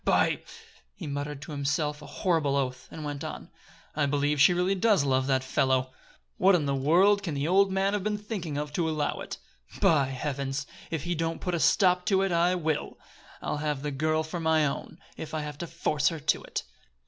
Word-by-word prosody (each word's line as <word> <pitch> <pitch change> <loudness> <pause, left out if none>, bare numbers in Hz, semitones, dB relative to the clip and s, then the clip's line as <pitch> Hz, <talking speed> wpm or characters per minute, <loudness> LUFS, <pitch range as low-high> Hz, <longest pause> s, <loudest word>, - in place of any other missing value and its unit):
"By - - +2 0.3
!" - - -29
He 180 - -8
muttered 145 0 -4
to 150 - -9
himself 145 +1 -1
a - - -10
horrible 160 -6 0
oath, 130 -2 -2
and 155 - -7
went 145 -1 -4
on: - - -7 0.4
"I 145 -1 +2
believe 145 0 +1
she 160 - +7
really 180 +2 +2
does 195 -4 +3
love 130 -1 +1
the 135 -1 +3
fellow! 130 0 +1 0.4
What 190 +1 +5
in 160 -4 +1
the 140 - 0
world 175 +9 +4
can 165 -7 -3
the 140 +2 -1
old 195 +2 +4
man 195 +1 +1
have 205 -2 -1
been 210 0 0
thinking 200 -8 -5
of 150 0 -4
to 165 0 0
allow 150 -2 -1
it? - - -6 0.4
By 145 -4 +4
heavens! 135 0 -3 0.2
if 160 -4 -3
he 175 +1 -1
don't 165 0 -2
put 180 - -3
a 170 - 0
stop 180 -1 +3
to 195 -1 +3
it, 195 - 0
I 175 +2 +3
will. 160 -4 -2 0.5
I'll - - -2
have 150 -2 -2
the 150 - -2
girl 155 +3 0
for 160 +2 -5
my 160 -1 +3
own, 140 - -4 0.2
if 160 0 -6
I 155 - -1
have 150 -1 -7
to 170 - -4
force 155 -2 0
her 165 -2 0
to 150 +1 +1
it! - - -4
155 Hz, 220 wpm, -28 LUFS, 145-175 Hz, 0.5 s, she